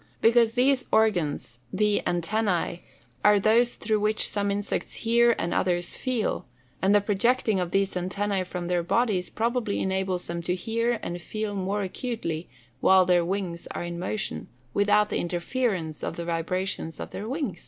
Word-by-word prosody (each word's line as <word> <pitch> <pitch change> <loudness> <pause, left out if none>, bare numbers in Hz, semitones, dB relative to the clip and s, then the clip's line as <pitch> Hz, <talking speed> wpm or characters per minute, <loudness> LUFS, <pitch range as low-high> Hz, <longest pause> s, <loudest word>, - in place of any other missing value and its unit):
_ - - -29 0.2
Because 230 0 +4
those 260 +1 +3
organs 175 - +1
(the 210 -1 +2
antennæ), 175 0 0 0.4
are 210 -1 +6
those 230 +4 +3
through 215 -1 0
which 215 +1 +1
come 205 -1 0
insects 200 0 -2
hear 235 0 +5
and 170 - -1
others 175 -1 0
feel; 250 - -2 0.3
and 195 +2 +4
the 205 - +5
projecting 215 +1 +2
of 180 -1 -1
these 195 +1 +1
antennæ 190 +1 -1
from 180 -1 -4
their 175 0 +1
bodies 190 0 +1
probably 230 -2 -1
enables 190 -1 -1
them 170 0 -4
to 180 +1 -1
hear 230 +4 -1
or 175 +1 -4
feel 215 +4 -4
more 200 +2 -1
acutely 185 -5 -4 0.3
while 190 -1 +5
their 180 -1 +4
wings 180 -2 -3
are - - -3
in 170 0 -5
motion, 195 +3 -3 0.3
without 205 +1 +3
the - - +1
interference 175 -2 -2
of - - -3
the 170 - -5
vibrations 170 0 -2
of - - -6
their 210 +3 -5
wings. 260 - -3
200 Hz, 165 wpm, -26 LUFS, 175-220 Hz, 0.4 s, are